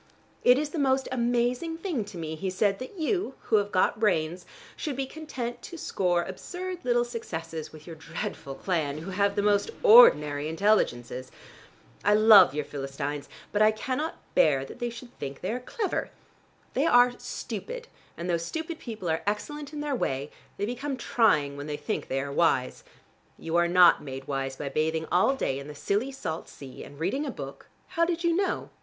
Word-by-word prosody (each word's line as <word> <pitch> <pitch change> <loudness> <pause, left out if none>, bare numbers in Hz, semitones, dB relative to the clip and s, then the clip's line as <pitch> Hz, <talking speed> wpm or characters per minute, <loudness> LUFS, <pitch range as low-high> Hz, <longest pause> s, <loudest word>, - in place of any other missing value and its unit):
"It 250 +1 +7
is 295 +1 -2
the 330 - -3
most 265 -1 +2
amazing 245 +6 0
thing 330 - -2
to 200 -3 -10
me," 160 -1 -4
he 185 +4 -3
said, 195 +1 +1
"that 255 +10 -8
you, 325 -3 -1
who 220 - +2
have 205 0 0
got 185 +2 +2
brains, 175 -4 0 0.3
should 295 -4 -3
be 270 +1 -1
content 260 -5 -6
to 340 - -9
score 180 - 0
absurd 360 - -6
little 240 -1 +2
successes 165 -9 -6
with 155 -1 -13
your 165 - -8
dreadful 160 -3 -6
clan, 155 -6 -1
who 165 +5 -6
have 200 +1 +1
the 205 - +1
most 205 - +2
ordinary 150 - +7
intelligences. 130 - +1 0.7
I 205 +1 +5
love 210 -8 +8
your 150 -1 -1
Philistines, 140 +1 -5 0.2
but 210 - +1
I 215 - +7
cannot 260 +8 -2 0.2
bear 135 -3 +4
that 135 - -11
they 240 -1 -1
should 235 +1 -11
think 140 0 -6
they 185 - -2
are 245 - -2
clever. 395 - -3 0.6
They - - +2
are 245 0 +6
stupid, - - -6 0.3
and 170 - -4
though 175 -1 +2
stupid 320 - -5
people 220 - -6
are 160 0 0
excellent 290 +8 -3
in 300 -1 -5
their 295 -1 -2
way, 140 - -2 0.3
they 200 - -1
become 260 +4 -3
trying 210 - +2
when 145 +1 -6
they 150 -1 -3
think - - -3
they 135 0 -1
are 140 +1 -5
wise. 140 -4 +1 0.5
You 165 0 -4
are 175 0 +4
not 175 -1 +6
made 135 -1 -7
wise 135 -1 -2
by 140 +1 -4
bathing 160 +2 0
all 185 +10 +4
day 135 - -1
in 140 - -8
the 150 - -8
silly 210 - -1
salt 165 -12 -5
sea, 135 -1 -10
and 140 - -12
reading 195 - 0
a - - -3
book - - -8
" - - -37
"How 335 - +1
did 340 0 0
you 340 -1 +3
know?" 390 +1 -1
205 Hz, 195 wpm, -27 LUFS, 155-260 Hz, 0.7 s, love